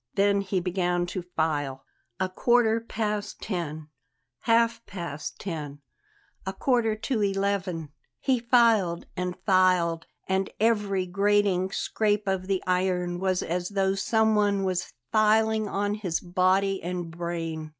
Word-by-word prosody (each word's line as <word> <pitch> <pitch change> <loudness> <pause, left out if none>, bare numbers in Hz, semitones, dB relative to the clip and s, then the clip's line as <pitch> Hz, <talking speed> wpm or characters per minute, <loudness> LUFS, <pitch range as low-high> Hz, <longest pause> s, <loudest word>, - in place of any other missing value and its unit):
Then 200 0 +3
he 190 -1 -1
began 180 -1 0
to 185 +1 -4
file. 150 -6 -2 0.3
A 190 - +1
quarter 230 +3 +3
past 210 -2 -3
ten 160 -5 -4 0.6
half 230 0 +3
past 170 -5 -6
ten 150 -6 -6 0.6
a 190 - -4
quarter 230 0 +1
to 220 +1 -2
eleven 195 -5 -1 0.3
He 260 -3 +1
filed 230 -7 +3
and 180 -1 -3
filed, 180 -3 +3 0.2
and 190 0 0
every 205 -4 +1
grating 195 0 +2
scrape 210 0 0
of 190 -1 -1
the 195 -2 0
iron 180 -1 0
was 185 -1 0
as 175 +1 -2
though 195 -1 +1
someone 210 -1 +2
were 185 -1 0 0.3
filing 220 0 +3
on 205 +1 -1
his 195 -6 -2
body 185 +2 +1
and 175 -1 -4
brain. 165 -2 -4
190 Hz, 130 wpm, -27 LUFS, 175-210 Hz, 0.6 s, Then